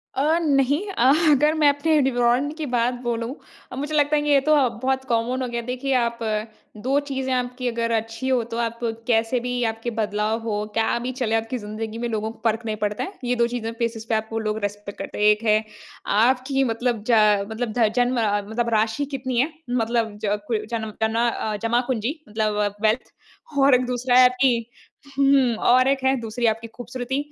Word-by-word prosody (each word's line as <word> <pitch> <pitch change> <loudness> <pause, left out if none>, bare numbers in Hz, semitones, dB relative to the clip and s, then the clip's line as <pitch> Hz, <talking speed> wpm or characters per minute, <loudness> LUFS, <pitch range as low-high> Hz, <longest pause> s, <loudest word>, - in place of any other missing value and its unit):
अ, 305 +5 +2
नहीं। 285 -2 +2
अह, 270 -6 +4 0.2
अगर 300 +2 +4
मैं 310 -2 +3
अपने 300 +2 +2
डिवरॉन्ड 250 +2 +1
की 310 - -3
बात 245 -1 +1
बोलूँ। 235 +2 -3 0.4
अब 255 - -7
मुझे 290 +3 -4
लगता 295 0 +3
है 295 - +2
कि 295 - -2
ये 285 -1 +6
तो 305 +3 +2
अब 245 -6 +1
बहुत 265 0 0
कॉमन 235 +3 0
हो 255 - -1
गया 235 0 -3
है। - - -12
देखिए, 255 +2 -2
आप 235 -1 0 0.6
2 265 +6 +1
चीज़ें 265 -1 -2
आपकी 250 0 -2
अगर 230 -1 -1
अच्छी 225 +2 -2
हों, 255 -3 +2
तो 230 0 -6
आप 230 0 -2 0.3
कैसे 230 +1 +2
भी 245 0 -2
आपके 225 +2 -5
बदलाव 210 +1 0
हो, 210 -2 -2
क्या 225 +1 +1
भी 250 +2 -3
चले 225 -3 +1
आपकी 225 +3 -1
ज़िंदगी 215 +1 -6
में, 240 0 -2
लोगों 220 0 -2
को 230 - -17
फ़र्क 225 0 0
नहीं 215 -1 -2
पड़ता 205 0 -2
है। 385 - -5
ये 245 0 0
2 235 0 +2
चीज़ें 235 -2 -4
फ़ेसिस 230 -1 -2
पे 225 - 0
आपको 220 +1 -2
लोग 215 -1 -2
रिस्पेक्ट 205 0 -5
करते - - -6
हैं। 210 - +3
एक 210 +1 +4
है, 215 0 +3 0.4
आपकी 255 +5 +2
मतलब 235 -2 -1
ज 210 -3 +4
मतलब 220 0 -3
ध 225 -3 +4
जन्म 245 +1 +2
अ, 205 -1 +1
मतलब 235 +2 -1
राशि 220 +6 +1
कितनी 255 -2 -2
है? 280 +6 +1 0.2
मतलब 230 -3 0
ज 205 0 +1
कु 215 -3 -1
जन्म 220 -1 -4
जना 225 +2 +2
अ, 215 -2 -3
जमापूंजी 245 +4 -1
मतलब 210 -1 -1
वेल्थ। 220 +3 +1 0.5
और 270 -1 +6
एक 250 0 +1
दूसरा 245 0 0
है 255 - +8
आपकी 250 -2 +1 0.5
हुँ, 275 -4 +4
और 255 +3 +4
एक 270 -1 +1
है 265 0 +3
दूसरी 230 +2 -3
आपकी 225 +1 -6
ख़ूबसूरती। 245 +3 -5
240 Hz, 205 wpm, -23 LUFS, 220-260 Hz, 0.6 s, है